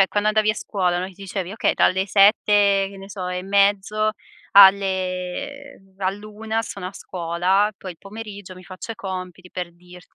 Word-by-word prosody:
cioè, 195 - +5
quando 210 +1 0
andavi 215 0 +3
a 215 - -2
scuola, 180 -6 -1
no, 185 - -3
ti 190 - -12
dicevi: 195 -1 -5
"Okay, 225 - 0
dalle 190 +2 +2
7, 200 0 +4
che - - -12
ne 195 +1 -11
so, 190 -2 -5
e 180 0 -3
mezzo 200 +2 +2 0.4
alle 190 +6 +3
ehm, 195 0 -25
all'una 215 +3 -3
sono 200 -3 -7
a 185 - -7
scuola, 185 +5 0
poi 185 -2 -8
il 165 - -24
pomeriggio 205 -2 -9
mi 185 - -13
faccio 185 +5 -7
i - - -11
compiti" 185 -2 -7
per 175 -2 -5
dirti 180 0 -17
195 Hz, 185 wpm, -22 LUFS, 185-205 Hz, 0.4 s, cioè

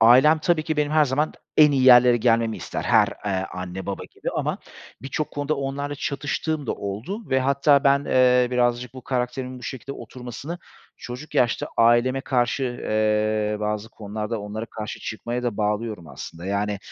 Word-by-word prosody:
ailem 130 +8 +7
tabii 155 +1 +1
ki 155 0 -2
benim 150 0 0
her 155 -1 +5
zaman 145 +3 0 0.2
en 150 -1 +7
iyi 135 -2 +2
yerlere 125 -1 +8
gelmemi 115 -1 +2
ister. - - -5
Her, - - +4 0.2
eee, 95 -1 -1
anne, 90 +1 -6
baba 100 - -4
gibi - - -5
ama - - -1 0.4
birçok 140 +3 -3
konuda 145 +1 -1
onlarla 140 +1 -3
çatıştığım 145 +1 -3
da - - 0
oldu 125 - -6
ve 130 - +3
hatta 140 +1 +3
ben, 140 +1 +4
eee, 125 -1 +4
birazcık 120 0 0
bu 130 - -9
karakterimin 125 0 -3
bu - - -15
şekilde 135 +1 -6
oturmasını 130 +7 -8 0.4
çocuk 125 +5 -9
yaşta 120 -2 +2
aileme 120 +3 +4
karşı, 130 0 0
eee, 110 -3 0
bazı 105 +1 -2
konularda 105 0 -5
onlara 105 +2 -5
karşı 110 -1 -7
çıkmaya 120 +3 -4
da 120 -4 -2
bağlıyorum 105 -4 -2
aslında. 85 +3 -9
Yani, 100 +1 -1
125 Hz, 165 wpm, -24 LUFS, 110-140 Hz, 0.4 s, yerlere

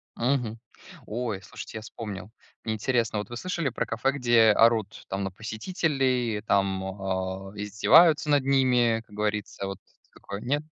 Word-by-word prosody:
Мгм. 120 -3 -1 0.5
Ой, 110 -3 -3
слушайте, - - -8
я - - -6
вспомнил. 105 -3 -7 0.3
Мне 110 - -1
интересно, 115 -1 0
вот 105 - -6
вы 120 - -6
слышали 170 -1 -2
про 115 - -2
кафе, 115 +4 0
где 120 -5 +4
орут 110 -1 +2
там 100 +1 -2
на 95 - -3
посетителей, 125 - -1
там, 95 -2 +1
а, 95 0 -4
издеваются 145 - +4
над 145 -2 +4
ними, 125 -4 +3
как 105 - -16
говорится, 105 -1 -2
вот 95 - -6 0.3
такое. 100 +1 -8
Нет? 145 +5 0
110 Hz, 150 wpm, -27 LUFS, 100-125 Hz, 0.5 s, где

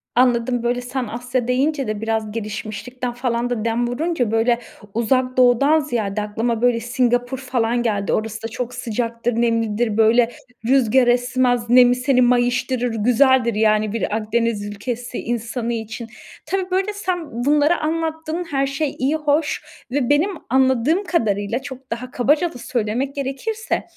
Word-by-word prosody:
Anladım. 245 -1 +2
Böyle, 245 +1 0
sen 250 0 -4
"Asya" 245 +2 -3
deyince 275 +2 +1
de 215 -1 -3
biraz 220 -1 -1
gelişmişlikten 225 +3 -5
falan 245 -1 -1
da 230 -3 -2
dem 230 +1 0
vurunca, 255 -2 -1
böyle, 230 +1 +2 0.3
Uzak 255 +3 +1
Doğu'dan 255 +5 +5
ziyade 220 -8 -2
aklıma, 225 +2 -2
böyle, 245 -1 +3
Singapur 245 +2 0
falan 245 -2 0
geldi. 205 -4 0
Orası 220 0 -2
da - - -2
çok 245 +2 -5
sıcaktır, 235 0 -2
nemlidir, 230 -1 0
böyle, 230 +2 +4 0.3
rüzgar 255 0 +4
esmez. 245 -1 +1
Nemi 245 0 +6
seni 255 0 +2
mayıştırır. 245 0 +1
Güzeldir, 245 +1 +3
yani, 215 -1 +2
bir 225 -2 -1
Akdeniz 225 -1 -1
ülkesi 240 +4 -5
insanı 235 0 -3
için. 225 +1 -5 0.4
Tabii, 375 +2 -2
böyle, 385 +3 0
sen 350 - -3
bunları 295 +3 +3
anlattın. 320 +1 -2
Her 275 -1 +1
şey 275 +1 -2
iyi 275 +4 +1
hoş 300 0 0 0.3
ve 265 -2 0
benim 295 +7 +3 0.2
anladığım 260 - +2
kadarıyla, 220 - 0
çok 265 -1 -10
daha 250 +2 -5
kabaca 295 +8 +1
da - - -9
söylemek 245 +2 -2
gerekirse 285 - -3
245 Hz, 145 wpm, -21 LUFS, 230-270 Hz, 0.4 s, Nemi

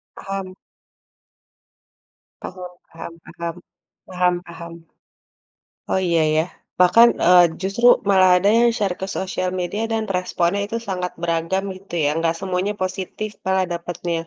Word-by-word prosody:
Paham. 195 -1 -6 1.9
Paham 180 -1 -8 0.2
paham 165 0 -9
paham, 170 0 -6 0.5
paham 180 -1 +1
paham. 170 0 -10 1.2
Oh, 190 - +2
iya 165 -2 +3
ya. 160 - +3 0.4
Bahkan, 230 +6 +7 0.2
eee, 180 0 +8 0.2
justru 200 +6 +1 0.2
malah 190 -2 +5
ada 200 +3 +3
yang 240 - +5
share 195 -5 -1
ke 190 - -3
sosial 185 -1 -2
media 205 +5 -3
dan 220 -1 0
responnya 180 +1 0
itu 230 - -4
sangat 180 -1 -3
beragam, 170 +3 -1
gitu 190 -2 -11
ya. - - +3
Nggak 165 0 +1
semuanya 190 +2 -2
positif 190 +3 -4 0.2
malah 190 0 +2
dapetnya. 170 -1 -4
185 Hz, 130 wpm, -21 LUFS, 170-195 Hz, 1.9 s, eee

